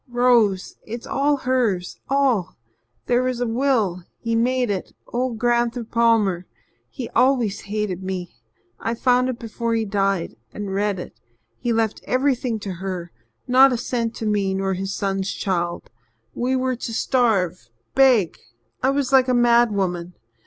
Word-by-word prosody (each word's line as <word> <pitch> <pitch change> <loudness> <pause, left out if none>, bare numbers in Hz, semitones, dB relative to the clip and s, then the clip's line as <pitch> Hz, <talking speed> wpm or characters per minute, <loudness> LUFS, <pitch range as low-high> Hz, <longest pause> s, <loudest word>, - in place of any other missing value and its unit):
Rose 240 -6 +2
it's 230 +2 -7
all 285 +1 +1
hers 240 -9 0
all. 265 -10 +1 0.5
There 245 0 +2
was 255 -1 -1
a 245 - 0
will 225 -7 +1
he 230 -1 -3
made 245 0 +1
it 190 -2 -4
old 245 -1 -2
Gran'ther 240 +1 +1
Palmer. 225 -6 +2 0.4
He 250 -4 -6
always 245 -5 +2
hated 205 -3 -3
me. 185 -2 -5 0.5
I 230 - -2
found 250 +1 +2
it 250 - -3
before 230 0 -3
he 225 -1 0
died 195 - -1
and 205 -2 -5
read 200 0 0
it. 175 - -7 0.5
He 240 - -1
left 225 -2 0
everything 255 -3 0
to 195 -2 -4
her 180 -3 -4 0.4
not 265 +2 +6
a 245 - 0
cent 230 -2 -2
to 225 - -5
me 200 -2 +1
nor 195 0 0
his 190 +1 -3
son's 195 -1 -1
child 175 -3 -2 0.4
we 255 +2 0
were 260 0 0
to 230 - -5
starve 200 - +1 0.2
beg. 255 -10 +4 0.4
I 260 - +3
was 275 -1 0
like 260 -1 +6
a 255 - +2
madwoman. 205 -8 +2
230 Hz, 150 wpm, -22 LUFS, 195-250 Hz, 0.5 s, not